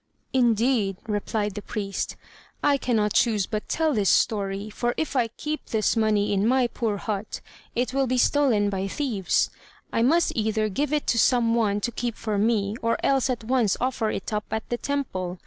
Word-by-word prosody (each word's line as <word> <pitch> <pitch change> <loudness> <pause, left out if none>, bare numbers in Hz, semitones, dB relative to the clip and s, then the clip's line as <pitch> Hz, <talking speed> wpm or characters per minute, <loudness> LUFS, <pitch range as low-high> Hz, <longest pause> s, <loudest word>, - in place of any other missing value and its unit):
"Indeed," 235 -5 +2
replied 210 0 -1
the 210 - -6
priest, 200 -2 -4 0.5
"I 285 -1 +4
cannot 215 -5 +1
choose 220 -5 +3
but 215 +1 -4
tell 320 -2 +1
this 205 -5 +2
story. 200 -1 +1
For 240 +3 -1
if 315 -3 -2
I 245 -3 +3
keep 300 +7 -5
this 220 +1 +1
money 215 -2 +2
in 200 +2 +2
my 255 +1 +3
poor 225 -3 -2
hut, 205 0 -4 0.4
it 245 +1 -1
will 270 -1 +1
be 255 +1 0
stolen 240 -7 +3
by 195 0 -2
thieves: 215 -5 0 0.4
I - - +2
must 320 +8 +3
either 215 -1 0
give 280 +8 -1
it 300 -1 0
to 235 - +2
some 235 -2 +3
one 210 -3 +1
to 240 - -1
keep 235 0 -3
for 215 -3 -2
me, 210 -1 +1
or 230 0 +1
else 270 -1 +2
at 245 -3 -2
once 235 -3 +1
offer 250 -3 0
it 205 - -4
up 210 0 -1
at 220 0 -3
the 240 - -1
temple. 185 -11 -3
225 Hz, 190 wpm, -25 LUFS, 205-250 Hz, 0.5 s, I